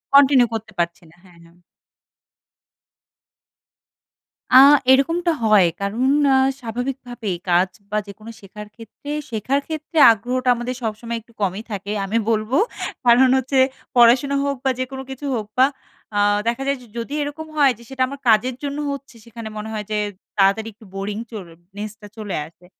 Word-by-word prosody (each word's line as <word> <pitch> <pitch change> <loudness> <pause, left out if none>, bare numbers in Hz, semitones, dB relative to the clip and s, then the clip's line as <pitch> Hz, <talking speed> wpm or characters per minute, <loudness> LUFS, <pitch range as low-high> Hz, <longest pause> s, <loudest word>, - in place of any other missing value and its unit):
Continue 270 -3 +6
করতে 220 0 -5
পারছি 170 +3 -2
না। 165 - -21
হ্যাঁ, 175 -2 -19
হ্যাঁ। 170 +1 -21 2.9
আ - - +4 0.4
এরকমটা 330 +6 +3
হয় 210 -4 +5 0.2
কারণ 210 +6 -2 0.3
আ - - +5 0.2
স্বাভাবিকভাবেই 245 -3 -4
কাজ 180 +2 +3 0.2
বা 210 - 0
যেকোনো 215 +3 -10
শেখার 210 +2 -10
ক্ষেত্রে 230 +6 -10 0.2
শেখার 240 +5 -1
ক্ষেত্রে 315 +1 -6
আগ্রহটা, 250 +4 -1
আমাদের 245 +2 -4
সবসময় 230 +2 -3
একটু 235 +1 -25
কমই 195 +3 -1
থাকে, 200 0 -5
আমি 220 +4 -1
বলবো 220 +5 +1 0.5
কারণ 250 +2 +6
হচ্ছে 265 +1 0 0.4
পড়াশোনা 245 +4 +5
হোক 280 0 -1
বা - - +4
যে - - +1
কোনো 265 0 -6
কিছু 265 +2 -7
হোক 215 -2 -4
বা 260 - +7 0.5
আ - - +3 0.3
দেখা 240 +3 -1
যায় 275 0 +1
যে 240 - -15
যদি 235 +5 -5
এরকম 290 +2 -5
হয় 280 -3 +5
যে 235 - -15
সেটা 265 -1 -6
আমার 280 +1 -8
কাজের 240 +3 +3
জন্য 285 0 -3
হচ্ছে 275 -3 -8
সেখানে 230 -1 -9
মনে 215 +1 -5
হয় 210 -1 -4
যে 210 - 0 0.4
তাড়াতাড়ি 200 +3 +3
একটু 215 +1 -18
বোরিং 205 +1 -4
চল 205 -5 -7 0.3
নেসটা 210 0 -7
চলে 210 -3 -4
আসে। 175 +2 -21
235 Hz, 160 wpm, -21 LUFS, 210-265 Hz, 2.9 s, বা